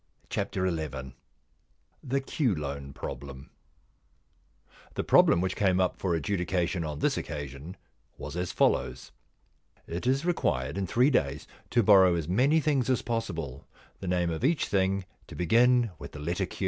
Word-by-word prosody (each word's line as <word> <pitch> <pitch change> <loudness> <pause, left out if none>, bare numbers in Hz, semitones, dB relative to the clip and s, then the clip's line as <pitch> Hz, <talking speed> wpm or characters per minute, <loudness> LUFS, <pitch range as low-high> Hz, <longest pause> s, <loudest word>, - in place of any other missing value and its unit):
XI - - +1 1.6
THE 135 +2 -1
Q 130 - +1
LOAN 70 -2 -5
PROBLEM 70 0 -8 1.4
The - - -1
problem 85 - +5
which 95 0 -1
came 95 -2 +2
up 90 -1 0
for 90 -3 0
adjudication 90 -1 -1
on 75 -2 -4
this - - +1
occasion 75 +3 -6 0.4
was - - -7
as 90 0 -2
follows: 65 +1 0 0.3
— - - -42
* - - -34
It 90 +8 -4
is 135 +5 +1
required 75 - 0
in 95 - -2
three 125 - +3
days 70 - 0 0.2
to 120 -1 +3
borrow 95 -3 +6
as 80 -3 -2
many 130 - +3
things 140 -4 +1
as 130 - +1
possible, 80 - -4 0.3
the 95 - -6
name 90 -1 +1
of 80 - -4
each 150 +2 +2
thing 95 -1 0 0.2
to - - -10
begin 120 +6 +3
with - - -9
the 75 - -8
letter 85 +4 -2
Q. - - -11
90 Hz, 160 wpm, -28 LUFS, 75-120 Hz, 1.6 s, borrow